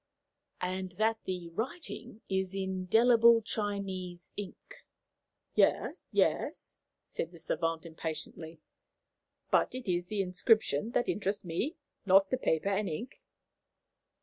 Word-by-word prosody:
"And 185 0 -2
that 220 +3 +1
the 180 -2 -4
writing 230 - -5
is 190 0 -1
in 195 - -1
indelible 225 +5 +5
Chinese 195 -5 -3
ink?" 205 -3 -9 0.7
"Yes, - - +2
yes," - - 0 0.3
said 165 - -4
the 170 - -13
savant 165 0 -1
impatiently; 160 0 -5 0.9
"but - - +3
it 255 -3 -5
is 175 -1 0
the 205 -1 0
inscription 190 - +2
that - - +2
interests 200 -1 -1
me, 175 - -2 0.3
not 195 0 +5
the 255 - +2
paper 160 -4 +1
and 200 0 0
ink." 240 - -6
190 Hz, 120 wpm, -31 LUFS, 175-220 Hz, 0.9 s, indelible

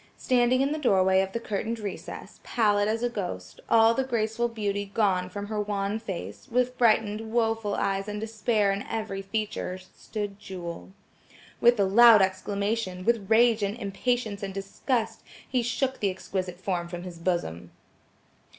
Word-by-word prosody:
Standing 250 0 +3
in 275 +1 +1
the 310 - -2
doorway 190 -7 +4
of 190 0 -3
the 230 - -2
curtained 225 +1 -3
recess, 205 -4 -7
pallid 205 -3 +2
as 225 +2 -1
a - - +3
ghost, 180 - -5
all 225 0 +6
the 265 - 0
graceful 235 -2 0
beauty 205 -3 -3
gone 190 -5 +1
from 200 +2 -5
her 210 0 -2
wan 205 +1 -2
face, 195 0 -7
with 250 +1 +1
frightened 220 -2 +2
woful 225 -3 0
eyes 195 +1 -1
and 210 0 -4
despair 215 -1 +1
in 195 +1 -2
every 215 -3 -3
feature, 195 -2 -3
stood 200 +2 -7
Jewel. 175 -4 -7 0.7
With 240 -1 +5
a - - +5
loud 220 +1 +8
exclamation, 190 0 -2
with 230 -4 +1
rage 225 0 +5
and 200 +2 -1
impatience 220 0 -2
and 195 -1 -5
disgust, 220 +5 -2 0.3
he 255 -2 +1
shook 255 +3 -1
the 200 - +1
exquisite 185 -1 -4
form 180 -2 -2
from 175 0 -7
his 175 -2 -8
bosom. 90 - -2
210 Hz, 160 wpm, -27 LUFS, 195-230 Hz, 0.7 s, loud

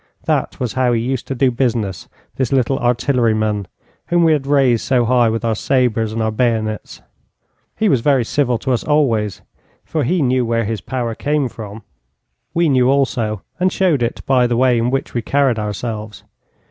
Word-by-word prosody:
That - - -1
was 125 -4 -2
how 130 -2 +1
he 115 - +1
used 130 +1 -3
to 135 - -3
do 130 0 +2
business, 115 -6 -2 0.3
this 130 -3 -1
little 135 0 +1
artilleryman, 115 -5 +1 0.4
whom 175 0 +2
we 160 -1 +5
had 140 -3 -1
raised 135 -5 +3
so 125 -3 +2
high 120 -1 +3
with 115 +1 -2
our 115 - +1
sabres 115 -2 0
and 110 0 -2
our 110 - 0
bayonets. 110 -2 -2 0.7
He 220 - +2
was 135 - +2
very 135 -3 +2
civil 125 -1 0
to 130 - -3
us 120 - 0
always, 115 -9 0 0.4
for 155 -2 -1
he 165 +5 +1
knew 130 -1 +2
where 115 -1 0
his 110 -2 -3
power 120 -3 -3
came 145 +3 -1
from. 110 -2 -9 0.7
We 170 0 +3
knew 130 -3 +3
also, 120 -7 0 0.2
and 185 +1 +2
showed 175 -10 +1
it 115 - -2
by 125 -2 +3
the 120 -1 0
way 125 -1 +3
in 115 +1 +1
which 135 +1 -2
we 120 - -1
carried 135 -2 +1
ourselves. 105 0 -5
125 Hz, 185 wpm, -18 LUFS, 115-135 Hz, 0.7 s, we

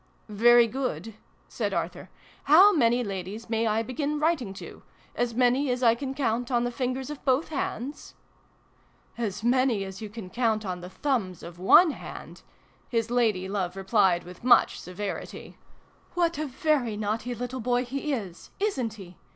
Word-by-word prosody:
"Very 235 +3 +6
good," 245 -2 -4 0.3
said - - -3
Arthur. - - -4 0.2
" - - -28
How 385 +7 +8
many 245 -5 +3
ladies 200 +3 -6
may 225 0 +1
I 220 +1 +1
begin 290 +5 -2
writing 300 - 0
to? - - -10 0.3
As 240 -1 -1
many 255 +3 +2
as 250 0 -1
I 230 -2 +6
can 265 +3 -5
count 245 -3 -1
on 240 -2 +1
the 245 - -1
fingers 255 +2 -3
of 295 - -9
both 265 +4 +1
hands? 280 -2 -5 0.5
" - - -36 0.3
"As 215 -2 -3
many 245 -3 +2
as 190 +1 -8
you 215 - -6
can 205 -4 -9
count 225 -3 0
on 180 -2 -4
the 180 - -8
thumbs 195 - -2
of 170 +1 -10
one 315 - +6
hand! - - -9 0.3
" - - -34
his 230 -1 -1
lady 220 -6 +1
love 190 -2 -2
replied 190 -2 +2
with 180 +3 -13
much 250 - +5
ii8 - - -9
SYLVIE - - -10
AND 180 - -11
BRUNO 205 -1 -2
CONCLUDED. - - -10
severity. - - -11 0.3
" - - -33
What 340 -3 +1
a 310 - -2
very 260 -4 0
naughty 220 +4 -2
little 245 +2 -5
boy 245 +2 +1
he 275 +4 -3
is! 195 -10 -5
Isn't 265 - -1
he 185 -4 -12
240 Hz, 190 wpm, -27 LUFS, 205-260 Hz, 0.5 s, How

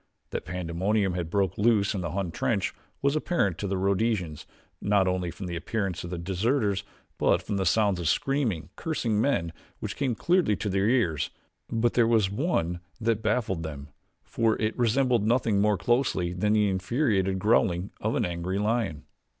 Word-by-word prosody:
That - - -4
pandemonium 90 +4 0
had 85 -2 -3
broken 95 +1 0
loose 105 -4 +3
in 95 - -2
the 85 - -3
Hun 95 -3 -2
trench - - -1 0.3
was 140 +1 +2
apparent 150 - 0
to 100 - -2
the 95 0 -1
Rhodesians 95 -4 0 0.3
not 100 -2 +3
only 90 -1 0
from 85 +4 -7
the 85 -1 -4
appearance 95 0 -2
of 85 - -6
the 90 - -4
deserters, 100 +3 0 0.4
but - - +3
from 100 - -2
the 95 -2 0
sounds 100 -1 +2
of 85 - -2
screaming, 125 - 0
cursing 115 -10 -1
men 85 - 0 0.3
which 105 +1 -4
came 135 -4 0
clearly 175 - +2
to 105 - -3
their 95 +2 +2
ears; 90 - +1 0.4
but 120 +1 +1
there 120 -2 +4
was 110 -4 +3
one 100 - 0 0.2
that 115 -1 0
baffled 110 -5 0
them 75 -3 -7 0.3
for 115 -1 0
it 110 0 0
resembled 120 -1 +2
nothing 115 -4 +2
more 105 -1 +3
closely 95 -4 +1
than 105 +4 +1
the 105 -1 +3
infuriated 95 0 +1
growling 95 -2 +2
of - - 0
an - - +1
angry 90 +2 -2
lion. 105 -7 -1
100 Hz, 175 wpm, -27 LUFS, 90-115 Hz, 0.4 s, there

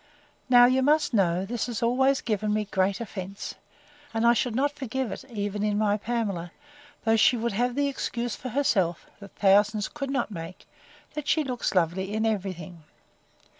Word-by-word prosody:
Now, 245 -1 +8
you 255 +1 +3
must 300 +1 +2
know, 185 -3 +2
this 235 +4 -3
has 235 -1 -3
always 265 +3 +3
given 215 -2 -1
me 210 0 0
great 195 0 0
offence; 195 -3 -6 0.6
and 225 +1 +1
I 235 - +7
should 240 0 -1
not 285 +3 +2
forgive 265 -3 -3
it, - - -6
even 205 -3 -3
in 210 -1 +1
my 210 -1 +2
Pamela: 205 -6 -3 0.5
though 225 0 +4
she 235 +2 +4
would 235 +1 -1
have 245 +4 0
this 285 0 +1
excuse 240 -3 -3
for 255 - -7
herself, 200 - +1
that 200 -1 -13
thousands 205 +1 +3
could 280 -2 -5
not 275 -5 -1
make, 170 -1 -8 0.5
That 300 -1 -5
she 310 - +2
looks 250 -6 -2
lovely 185 +3 0
in 220 +1 0
every 200 -4 -1
thing. 170 -1 -11
220 Hz, 180 wpm, -26 LUFS, 195-250 Hz, 0.6 s, Now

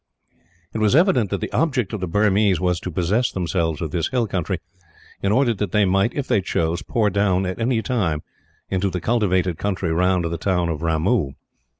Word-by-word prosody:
It 110 - -3
was 110 +2 +3
evident 140 - +3
that 100 -2 -2
the - - -4
object 130 - 0
of 110 - -2
the 90 - -3
Burmese 100 0 +2
was 90 -1 0
to 90 - -5
possess 95 +8 0
themselves 85 -3 -1
of 80 - -4
this 85 -1 0
hill 125 -3 0
country 95 -2 -2 0.6
in 100 - +1
order 120 +1 +3
that 105 -3 -4
they 105 -1 +4
might, 95 +4 +1
if 140 -2 -2
they 100 - +2
chose, 85 -2 -1
pour 105 +6 0
down 95 -1 +1
at 95 +5 -4
any 115 -1 +1
time 90 - -1 0.5
into 95 +1 +1
the 90 0 -3
cultivated 95 -6 +1
country 95 -4 -1
round 90 +1 +2
the 85 0 -3
town 90 -2 0
of 80 -2 -3
Ramoo. 80 - +1
95 Hz, 200 wpm, -22 LUFS, 85-110 Hz, 0.6 s, they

